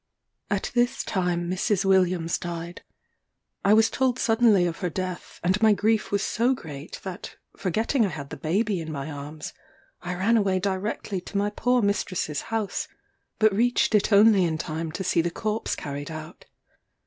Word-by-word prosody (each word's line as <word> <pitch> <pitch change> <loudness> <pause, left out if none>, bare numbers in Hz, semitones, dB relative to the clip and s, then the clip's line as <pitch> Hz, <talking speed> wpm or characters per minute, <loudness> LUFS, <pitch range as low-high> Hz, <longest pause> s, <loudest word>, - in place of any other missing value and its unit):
At 200 -2 -1
this 245 +2 +1
time 175 -3 -1
Mrs. 185 +2 0
Williams 185 -3 +2
died. 170 0 -6 0.8
I 200 +2 +5
was 220 0 +4
told 260 -2 +1
suddenly 225 -6 +4
of 170 -1 -3
her 180 - -1
death, 185 +1 -5
and 185 +4 +1
my 220 -1 +6
grief 215 +2 +1
was 200 0 +1
so 245 +3 +1
great 150 - -9
that, 190 0 -7 0.2
forgetting 220 - 0
I 200 - +1
had 140 -4 -7
the - - -4
baby 195 +4 0
in 160 -1 -5
my 140 +1 -5
arms, 145 +2 -7 0.5
I 180 0 -4
ran 210 +6 +3
away 195 -3 +2
directly 195 0 -2
to 200 - -5
my 205 +1 +1
poor 245 +2 +1
mistress's 185 -7 -1
house; 220 -3 -2 0.5
but 215 -2 +4
reached 240 +2 +2
it 210 +1 +3
only 205 -1 +6
in 160 -2 0
time 160 +1 -4
to 190 - -3
see 175 -2 +2
the 175 - -1
corpse 215 +5 -2
carried 145 +1 -6
out. 155 +1 -9
190 Hz, 170 wpm, -25 LUFS, 170-215 Hz, 0.8 s, my